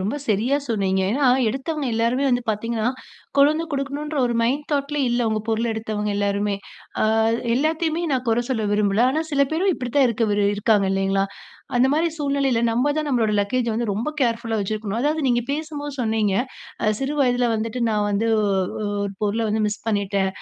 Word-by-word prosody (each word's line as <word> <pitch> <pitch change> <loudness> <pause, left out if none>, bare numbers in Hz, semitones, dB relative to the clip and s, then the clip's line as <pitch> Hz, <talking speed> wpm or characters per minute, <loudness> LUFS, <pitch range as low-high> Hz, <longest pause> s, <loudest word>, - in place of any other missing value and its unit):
ரொம்ப 205 +9 -2
சரியா 225 +7 +2
சொன்னீங்க. 195 -4 +1
ஏன்னா, 275 +4 +1 0.2
எடுத்தவங்க 275 +4 -3
எல்லாருமே 235 +4 +1
வந்து 245 0 +1
பார்த்தீங்கனா 220 +1 -2 0.5
கொண்டு 280 +1 +6
வந்து 325 +2 -3
குடுக்கணும்ன்ற 285 +2 -3
ஒரு 240 - -1
மைண்ட் 270 +6 0
தாட் 280 -1 0
லயே 285 -3 +1
இல்ல. 240 0 +1
உங்க 215 0 0
பொருள்ள 225 +1 +1
எடுத்தவங்க 215 -1 -3
எல்லாருமே. 200 0 0 0.5
ஆ - - +4 0.5
எல்லாத்தையுமே 320 +4 0
நான் 255 -1 -1
குறை 230 +1 +2
சொல்ல 225 -4 -1
விரும்பல. 205 0 +2
ஆனா 310 +3 0
சில 280 -1 +4
பேரும் 360 +4 +2
இப்டித்தான் 260 +2 +1
இருக்க 230 0 0
வி 205 - +1 0.2
இருக்காங்க 205 -1 +2
இல்லைங்களா? 195 0 +1 0.5
அந்த 250 +2 +5
மாரி 325 +3 +2
சூழ்நிலையில 275 -5 +1
நம்ம 245 +5 +1
தான் 310 - -1
நம்முடைய 225 -5 +1
லக்கேஜ்ஜ 235 +4 0
வந்து 235 +1 -1
ரொம்ப 220 +9 -2
கேர்ஃபுல்லா 230 -2 0
வைச்சிருக்கனும். 215 +1 -3
அதாவது, 300 +4 +1
நீங்க 240 -2 +2
பேசும்போது 290 -1 -4
சொன்னீங்க. 220 -4 +1 0.5
அ - - +2
சிறு 270 +2 -2
வயதில 245 -2 +2
வந்துட்டு 225 +2 -3
நான் 210 -1 +1
வந்து 205 +3 0
ஒ - - +1 0.6
ஒரு 200 -1 -3
பொருள 210 +2 0
வந்து 215 +1 0
மிஸ் 210 +1 -3
பண்ணிட்டேன். 200 -2 0
235 Hz, 180 wpm, -22 LUFS, 210-280 Hz, 0.6 s, கொண்டு